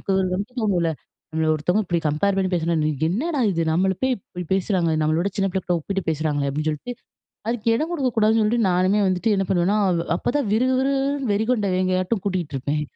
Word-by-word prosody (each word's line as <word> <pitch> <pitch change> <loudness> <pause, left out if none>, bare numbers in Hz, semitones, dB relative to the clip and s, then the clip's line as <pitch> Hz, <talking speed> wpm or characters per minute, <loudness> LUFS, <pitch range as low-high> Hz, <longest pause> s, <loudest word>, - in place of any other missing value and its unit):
நமக்கு 195 - -2 0.2
வந்து 200 +5 -4
தோணுல. 180 -6 +1 0.4
நம்மள 160 0 0
ஒருத்தவுங்க 180 +8 0
இப்பிடி 175 -2 -1
கம்பேர் 190 +7 +1
பண்ணி 190 -1 +1
பேசுனா, 170 -1 +1
"நீ 155 - +2 0.2
என்னடா! 285 - -1
இது 165 -2 0
நம்மள 190 +3 +2
போய் 260 0 +2
இப்பிடி 180 -3 -9
பேசுறாங்க? 185 -3 +1
நம்மள 155 +1 +1
விட 200 - 0
சின்ன 195 -1 +1
பிள்ளக்கிட்ட 180 -1 -1
ஒப்பிட்டு 195 +4 -3
பேசுறாங்களே!" 150 -2 -1
அப்பிடின்னு 155 +3 -1
சொல்ட்டு, 155 +12 -5 0.6
அதுக்கு 230 -1 -1
இடம் 310 +7 -2
கொடுக்கக்கூடாதுன்னு 225 -7 +2
சொல்ட்டு, 220 +3 +1
நானுமே 185 +3 +2
வந்துட்டு 185 +4 +1
என்ன 195 - +1
பண்ணுவேன்னா, 185 +3 +2 0.4
அப்ப - - -12
தான் 285 -5 0
விறு, 230 +4 +3
விறு, 275 +1 +1
விறுன்னு 275 -2 -1
வெறிகொண்ட 220 +1 +1
வேங்கையாட்டும் 185 +2 0
கூட்டிட்டு 180 -7 -2
இருப்பேன். 145 +3 -1
190 Hz, 190 wpm, -23 LUFS, 170-220 Hz, 0.6 s, விறு